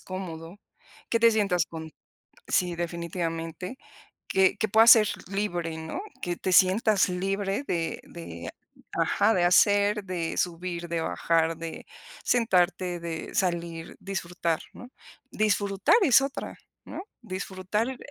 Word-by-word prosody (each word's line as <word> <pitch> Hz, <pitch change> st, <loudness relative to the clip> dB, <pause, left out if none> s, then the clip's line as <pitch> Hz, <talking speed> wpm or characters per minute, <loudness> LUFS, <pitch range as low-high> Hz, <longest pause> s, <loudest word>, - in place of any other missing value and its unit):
cómodo, 180 Hz, -1 st, -7 dB, 0.5 s
que 230 Hz, -, +1 dB
te 230 Hz, 0 st, +7 dB
sientas 200 Hz, -5 st, +1 dB
con 160 Hz, -1 st, -8 dB, 0.6 s
sí, 180 Hz, -2 st, +1 dB
definitivamente 170 Hz, +3 st, -4 dB, 0.5 s
que 190 Hz, 0 st, +3 dB
que 220 Hz, -, 0 dB
puedas 225 Hz, +3 st, +8 dB
ser 215 Hz, -2 st, +5 dB, 0.2 s
libre, 175 Hz, -5 st, -2 dB
¿no?, 160 Hz, -, -5 dB, 0.2 s
que 175 Hz, -1 st, -2 dB
te 185 Hz, -, -2 dB
sientas 195 Hz, +2 st, +4 dB
libre 195 Hz, +6 st, -2 dB
de 165 Hz, -1 st, -2 dB
de 85 Hz, -, -8 dB, 0.4 s
ajá, 220 Hz, +2 st, +2 dB
de 175 Hz, -, +2 dB
hacer, 205 Hz, +3 st, +4 dB
de 175 Hz, -3 st, -3 dB
subir, 175 Hz, 0 st, -2 dB
de 170 Hz, 0 st, -1 dB
bajar, 165 Hz, 0 st, +1 dB
de 165 Hz, -1 st, -7 dB, 0.4 s
sentarte, 180 Hz, -6 st, +1 dB
de 165 Hz, -1 st, -6 dB
salir, 170 Hz, -2 st, -2 dB
disfrutar, 175 Hz, -4 st, -2 dB
¿no?, 245 Hz, -, -11 dB, 0.4 s
disfrutar 205 Hz, -, +2 dB
es 270 Hz, -6 st, +6 dB
otra, 275 Hz, 0 st, -4 dB, 0.3 s
¿no?, -, -, -6 dB, 0.2 s
disfrutar 190 Hz, +2 st, -3 dB
eh 260 Hz, -, -6 dB
180 Hz, 125 wpm, -27 LUFS, 170-205 Hz, 0.6 s, puedas